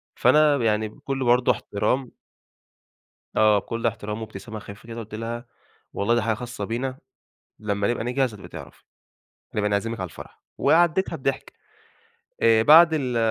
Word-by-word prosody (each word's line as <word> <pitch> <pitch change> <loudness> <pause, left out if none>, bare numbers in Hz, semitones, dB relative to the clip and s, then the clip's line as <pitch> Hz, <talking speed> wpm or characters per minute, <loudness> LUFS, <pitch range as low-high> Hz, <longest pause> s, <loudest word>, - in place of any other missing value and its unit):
فأنا 145 +3 +4
يعني 110 -2 0
بكل 135 +4 -4
برضه 125 +1 +4
احترام 120 +3 -2 1.2
آه، 110 -1 +5
بكل 115 +3 -5
احترام 105 0 -4
وابتسامة 110 +1 -8
خفيفة 100 +3 -12
كده 115 0 -7
قلت 110 -1 -8
لها: 115 +2 -5 0.5
"والله 115 +4 +1
دي 120 - +2
حاجة 110 0 0
خاصة 120 -3 -6
بينا، 130 +4 -3 0.6
لما 100 -1 -1
نبقى 120 -2 -1
نجهز 125 -1 0
هتبقي 100 - -11
تعرفي. - - -11 0.7
هنبقى 105 -1 0
نعزمك 110 +2 -1
على 95 - -3
الفرح." - - -13 0.2
وعديتها 175 +3 +3
بضحك. 135 0 -3 0.9
آآ 115 -1 +5
بعد 165 +4 +8
ال 130 -6 -1
115 Hz, 145 wpm, -24 LUFS, 105-130 Hz, 1.2 s, بعد